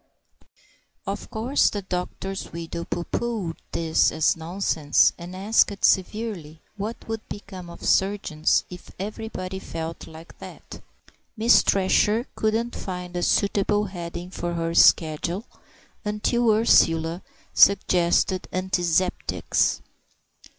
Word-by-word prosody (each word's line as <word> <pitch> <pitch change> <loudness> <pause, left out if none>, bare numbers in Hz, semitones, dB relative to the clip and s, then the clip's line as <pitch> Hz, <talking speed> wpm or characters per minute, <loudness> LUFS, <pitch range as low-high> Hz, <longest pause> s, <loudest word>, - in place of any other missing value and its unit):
Of - - -5
course 245 +6 +2
the 205 -2 -5
doctor's 190 +1 -5
widow 170 0 -6
pooh 175 - -3
poohed 210 -6 -3
this 160 -1 +2
as 160 - +2
nonsense, 165 -3 +2
and 175 +1 -9
asked 200 +1 +2
severely 190 -6 0 0.2
what 215 +3 -6
would 225 -1 -5
become 190 -4 -8
of 170 - -10
surgeons 190 -6 +2
if 180 - -11
everybody 195 -2 -5
felt 165 -2 -6
like 160 +1 -13
that! - - -11 0.6
Miss 230 +2 +6
Thresher 210 +4 +2
couldn't 225 +2 -1
find 180 -1 -6
a 175 - -1
suitable 205 +2 +1
heading 175 -1 -7
for 175 -2 -4
her 165 0 -2
schedule, 170 +5 +3 0.8
till 240 -1 +2
Ursula 165 -6 +3 0.3
suggested 185 -1 +3
"Antizeptics." 185 -1 0
185 Hz, 110 wpm, -24 LUFS, 170-210 Hz, 0.8 s, Miss